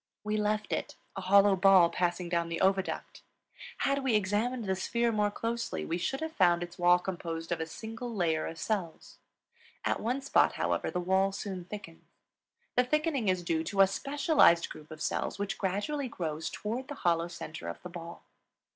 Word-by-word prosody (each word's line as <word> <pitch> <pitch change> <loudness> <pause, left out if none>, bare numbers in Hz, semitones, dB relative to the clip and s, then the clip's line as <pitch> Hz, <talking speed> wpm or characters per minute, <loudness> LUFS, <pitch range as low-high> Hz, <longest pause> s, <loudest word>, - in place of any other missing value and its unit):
We 210 0 -1
left 210 0 0
it, - - -3 0.2
a 195 - -4
hollow 200 +1 +5
ball 185 -2 +6
passing 175 0 -1
down 170 -1 0
the 165 0 -3
oviduct; 190 0 0 0.6
had 275 0 +1
we 255 -4 +2
examined 215 +4 0
the 190 -1 0
sphere 235 +5 0
more 210 -1 +2
closely 230 +3 -3
we 170 +2 -2
should 270 - -2
have 320 0 -3
found 175 - +3
its 175 0 -10
wall 175 0 +6
composed 170 -2 -5
of 170 - 0
a 160 - -3
single 225 +7 -7
layer 170 -7 0
of 165 - -7
cells. 185 -4 -4 0.7
At - - +1
one 250 +5 -2
spot, 280 - +3
however, - - -1
the 180 - -2
wall 190 +2 +2
soon 190 -2 -5
thickens. 185 -4 -9 0.7
The 250 - +5
thickening 300 -3 0
is 185 -1 +1
due 165 -1 0
to 195 +3 +2
a - - +9
specialized 275 - +3
group 155 0 -11
of 155 -1 -7
cells - - -1
which 200 -1 -3
gradually 210 +10 -1
grows 160 -8 -4
toward 240 +5 -4
the 290 - -6
hollow 170 -1 +3
center 160 - -7
of 85 - -7
the 180 - -6
ball. 170 -1 -9
190 Hz, 185 wpm, -30 LUFS, 170-225 Hz, 0.7 s, a